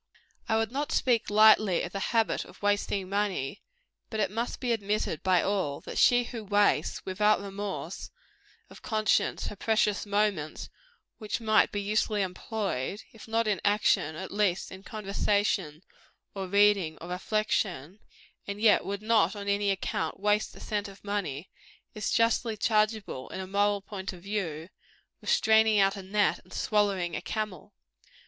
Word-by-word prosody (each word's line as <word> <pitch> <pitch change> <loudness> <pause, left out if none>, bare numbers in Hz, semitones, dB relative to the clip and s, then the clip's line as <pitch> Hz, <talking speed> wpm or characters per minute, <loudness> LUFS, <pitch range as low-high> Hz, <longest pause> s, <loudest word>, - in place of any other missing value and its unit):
I 220 - +3
would 225 0 0
not 285 +3 -2
speak 240 -3 +1
lightly 215 -3 +5
of 175 - -5
the 195 - -4
habit 225 -2 +1
of - - -17
wasting 205 -1 0
money; 195 -6 -2 0.5
but 220 - -4
it 195 -3 +1
must 230 +3 -3
be 250 -2 -1
admitted 205 -6 -1
by 185 -2 +3
all, 190 -8 -1
that - - -5
she 245 0 +5
who 230 -1 -7
wastes, 205 0 +1
without 210 +3 +2
remorse 195 -3 -5 0.6
of - - -15
conscience, 215 -2 +1
her - - -5
precious 210 -1 +1
moments 200 -7 -1 0.5
which 215 -3 -3
might 220 -1 +3
be 205 - -2
usefully 210 0 0
employed 190 - -3
if 225 - -13
not 225 0 0
in 205 -2 0
action, 205 -7 +2
at 190 +4 -7
least 200 -3 0
in 190 - -9
conversation, 200 -5 -1 0.5
or 195 -1 -4
reading, 200 -5 +3
or 170 - -9
reflection 185 -3 -1 0.5
and 200 0 -4
yet 220 -1 +5
would 200 +1 -4
not, 220 0 +3
on 200 -1 -7
any 200 0 +1
account, 185 -4 -2
waste 210 +1 +1
a - - -12
cent 205 -1 -3
of 195 0 -14
money, 190 -6 -3 0.5
is 215 -1 -3
justly 230 -1 +1
chargeable, 215 - 0
in - - -6
a 190 - -4
moral 200 +1 +1
point 195 -1 -6
of 175 -1 -13
view, 175 -6 -3 0.5
with - - -7
straining 220 0 +4
out 195 0 +3
a 195 - -6
gnat, 205 +2 +1
and - - -18
swallowing 200 -5 0
a - - -3
camel. 210 -2 -5
205 Hz, 160 wpm, -28 LUFS, 190-215 Hz, 0.6 s, lightly